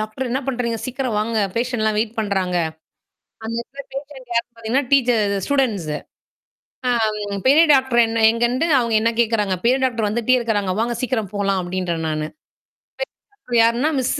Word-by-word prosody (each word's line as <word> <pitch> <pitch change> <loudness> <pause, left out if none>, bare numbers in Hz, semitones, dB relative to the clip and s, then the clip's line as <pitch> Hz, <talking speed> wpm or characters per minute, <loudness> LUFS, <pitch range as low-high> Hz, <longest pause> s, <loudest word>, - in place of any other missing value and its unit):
Doctor 215 +4 -4
என்ன 260 - 0
பண்றீங்க? 240 -3 -1
சீக்கிரம் 255 -3 -2
வாங்க, 225 +2 -1 0.2
பேஷண்ட்லாம் 230 -3 0
வெயிட் 220 +1 -1
பண்றாங்க. 190 -4 -1 0.9
அந்த 225 +1 -3
எடத்துல 275 +3 -10
பேஷன்ட் 270 -3 -8
யாருன்னு 235 +1 0
பார்த்தீங்கன்னா, 230 +5 -1
டீச்ச 265 -3 +5 0.2
அது 200 0 0
ஸ்டூடண்ட்ஸ். 230 - 0 1.0
ஆ, - - +3 0.6
பெரிய 305 +5 +7
டாக்டர் 265 -3 +3
என்ன 225 0 -1
எங்கன்ட்டு 240 +6 +1
அவுங்க 235 -2 0
என்ன 230 - +3
கேட்குறாங்க? 215 -4 +1
பெரிய 250 +3 +3
டாக்டர் 235 -4 +1
வந்துட்டே 235 +4 +2
இருக்கிறாங்க, 210 -5 0
வாங்க 240 +1 0
சீக்கிரம் 235 -6 -2
போலாம் 195 -1 +1
அப்பிடின்றேன், 175 -2 -3
நானு. 155 0 -2 1.0
பெரிய 410 0 -35
டாக்டர் 240 - +1
யாருன்னா 240 +6 +2
மிஸ். 250 - 0
235 Hz, 155 wpm, -21 LUFS, 210-255 Hz, 1.0 s, பெரிய